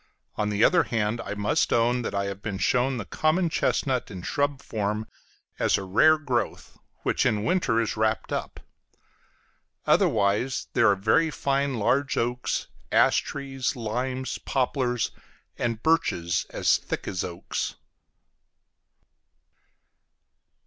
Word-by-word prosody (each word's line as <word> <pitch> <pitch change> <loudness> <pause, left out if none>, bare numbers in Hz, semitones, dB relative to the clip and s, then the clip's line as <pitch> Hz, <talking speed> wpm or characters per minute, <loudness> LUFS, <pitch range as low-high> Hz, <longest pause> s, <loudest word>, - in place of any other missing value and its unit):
On 105 0 -1
the 105 +1 +1
other 180 - +5
hand, 115 -1 -1
I 105 - -5
must 105 0 +1
own 120 +1 +2
that 115 - -4
I 100 0 0
have 100 0 -5
been 105 -3 -4
shown 125 +5 +1
the 110 - -5
common 165 - +1
chestnut 130 -5 0
in 95 -4 -8
shrub 145 +2 0
form 105 -4 -2 0.5
as - - +3
a - - -4
rare 135 +12 +5
growth, 130 -6 -3 0.3
which - - +1
in 105 -4 +1
winter 120 -4 +1
is 115 - -1
wrapped 110 0 0
up; - - -4 1.3
otherwise, 110 +4 +2
there 115 - +4
are 100 - +4
very 110 +12 +2
fine 140 -2 0
large 130 +6 +1
oaks, 125 +1 -1 0.3
ash - - +4
trees, 135 +1 -3
limes, 125 +3 -3
poplars, 125 -3 0 0.5
and 115 -2 -2
birches 85 - +1
as - - +2
thick - - -5
as 95 -1 -2
oaks. 85 -2 -4
120 Hz, 130 wpm, -26 LUFS, 105-135 Hz, 1.3 s, other